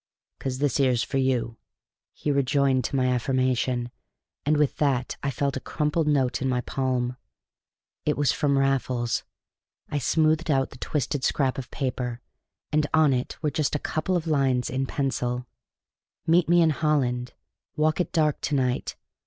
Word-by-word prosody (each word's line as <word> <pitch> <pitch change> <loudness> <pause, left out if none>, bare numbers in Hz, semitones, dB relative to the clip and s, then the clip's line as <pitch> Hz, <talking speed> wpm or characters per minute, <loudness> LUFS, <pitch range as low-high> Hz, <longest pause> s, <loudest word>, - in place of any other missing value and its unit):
"'Cause 130 -1 -3
this 145 +1 0
'ere's 125 -4 +3
for 135 - -1
you," 120 -4 0 0.5
he 150 - -2
rejoined 140 -1 +2
to - - -2
my 130 -1 +2
affirmative, 125 -1 0 0.6
and 150 0 +4
with 150 -2 +1
that 135 -4 0
I 140 - -1
felt 140 +1 -1
a - - -2
crumpled 150 +3 -1
note 135 -4 +1
in 130 - 0
my 125 -1 +1
palm. 125 -1 -1 0.9
It 150 - 0
was 145 -4 +3
from 140 -2 +1
Raffles. 130 -3 0 0.7
I 145 - 0
smoothed 155 +4 +2
out 135 -2 +2
the 125 - -13
twisted 145 -1 -2
scrap 135 -2 +1
of 125 - -7
paper, 125 -3 -3 0.5
and 150 0 +2
on 155 -3 +5
it 125 0 -2
were 150 - +1
just 150 -1 0
a 150 - -3
couple 175 +4 0
of 170 - -4
lines 135 -5 +1
in 135 +1 -1
pencil: 125 -3 -1 0.8
"Meet 165 +1 +3
me 175 0 +6
in 160 - +4
Holland 130 -5 0 0.4
Walk 155 +2 +2
at - - -3
dark 155 -4 +1
to 150 - -1
night. 125 -2 0
135 Hz, 165 wpm, -26 LUFS, 125-150 Hz, 0.9 s, me